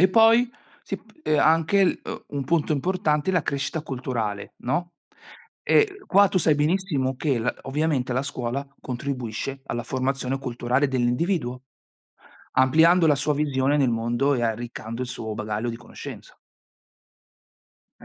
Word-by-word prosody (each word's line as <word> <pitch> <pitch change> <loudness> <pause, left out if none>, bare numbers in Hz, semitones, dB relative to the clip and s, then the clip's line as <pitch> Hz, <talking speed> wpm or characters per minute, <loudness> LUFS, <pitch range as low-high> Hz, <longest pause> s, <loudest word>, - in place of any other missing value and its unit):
E 185 - +6
poi, 225 +4 +5 0.3
si - - -4
p - - -23
e 155 - +2
anche 165 +5 +3 0.3
un 140 -2 -3
punto 160 +1 +1
importante, 155 +1 0
la 180 -4 +2
crescita 140 +3 -2
culturale, 120 -7 -4
no, 175 +8 -2 0.7
e 405 -2 +3
qua, 200 +1 +5
tu 185 - +1
sai 155 -2 +3
benissimo 150 -3 0
che 135 -2 0
la 115 - -1
ovviamente, 135 -3 0
la 130 +2 0
scuola 140 0 -3
contribuisce 130 0 -4
alla 120 - -3
formazione 130 +1 -2
culturale 125 +1 0
dell'individuo, 125 +1 0 0.9
ampliando 160 +6 +5
la 150 - +5
sua 145 +2 0
visione 140 -1 +1
nel 135 -4 +3
mondo 120 +5 +1
e 120 - -1
arriccando 115 +1 -3
il 125 - -4
suo 115 -3 -5
bagaglio 105 +2 -3
di 115 - -6
conoscenza. 120 0 -10 1.6
Eh, - - -14
135 Hz, 140 wpm, -24 LUFS, 125-160 Hz, 1.6 s, E